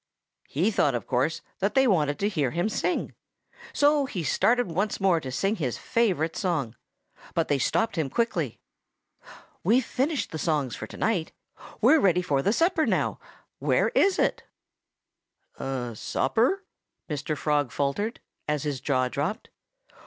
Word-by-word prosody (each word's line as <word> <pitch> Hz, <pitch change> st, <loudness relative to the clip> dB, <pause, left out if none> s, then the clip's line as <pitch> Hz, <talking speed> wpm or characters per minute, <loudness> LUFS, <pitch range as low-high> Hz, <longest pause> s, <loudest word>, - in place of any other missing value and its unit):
He 180 Hz, +10 st, +1 dB
thought, 145 Hz, -, +2 dB
of 120 Hz, -, -3 dB
course, 135 Hz, +6 st, 0 dB, 0.2 s
that 200 Hz, +2 st, 0 dB
they 265 Hz, 0 st, +5 dB
wanted 150 Hz, -, +2 dB
to 200 Hz, -, 0 dB
hear 155 Hz, -11 st, 0 dB
him 175 Hz, -, -1 dB
sing. 350 Hz, +10 st, -1 dB, 0.6 s
So 290 Hz, -1 st, +3 dB
he 180 Hz, -9 st, -4 dB
started 235 Hz, -, +2 dB
once 195 Hz, +5 st, -1 dB
more 190 Hz, -4 st, +3 dB
to 130 Hz, -4 st, -6 dB
sing 195 Hz, -, 0 dB
his 130 Hz, -9 st, -2 dB
favorite 190 Hz, -, 0 dB
song. 160 Hz, -, -1 dB, 0.6 s
But 165 Hz, -1 st, +1 dB
they 145 Hz, -, +2 dB
stopped 225 Hz, -, 0 dB
him 150 Hz, -4 st, 0 dB
quickly. 170 Hz, -, -1 dB, 1.1 s
"We've 230 Hz, +7 st, +3 dB
finished 285 Hz, +3 st, -1 dB
the 160 Hz, -, -4 dB
songs 145 Hz, -7 st, 0 dB
for 110 Hz, -, -7 dB
to -, -, -11 dB
night," 185 Hz, -8 st, 0 dB
they -, -, -30 dB
told -, -, -13 dB
him. -, -, -20 dB
"We're 320 Hz, -, +6 dB
ready 180 Hz, -, +3 dB
for 140 Hz, -5 st, +1 dB
the 200 Hz, -, +2 dB
supper 330 Hz, -, +2 dB
now.... -, -, 0 dB, 0.4 s
Where -, -, +2 dB
is 395 Hz, -1 st, +3 dB
it?" -, -, +1 dB, 1.2 s
"Supper?" 135 Hz, -, 0 dB, 0.4 s
Mr. 150 Hz, 0 st, -3 dB
Frog 145 Hz, -4 st, 0 dB
faltered, 175 Hz, -, -2 dB, 0.3 s
as 150 Hz, -2 st, -1 dB
his 145 Hz, -4 st, -3 dB
jaw 130 Hz, -3 st, +1 dB
dropped. 145 Hz, -, -3 dB
170 Hz, 160 wpm, -26 LUFS, 140-225 Hz, 1.2 s, We're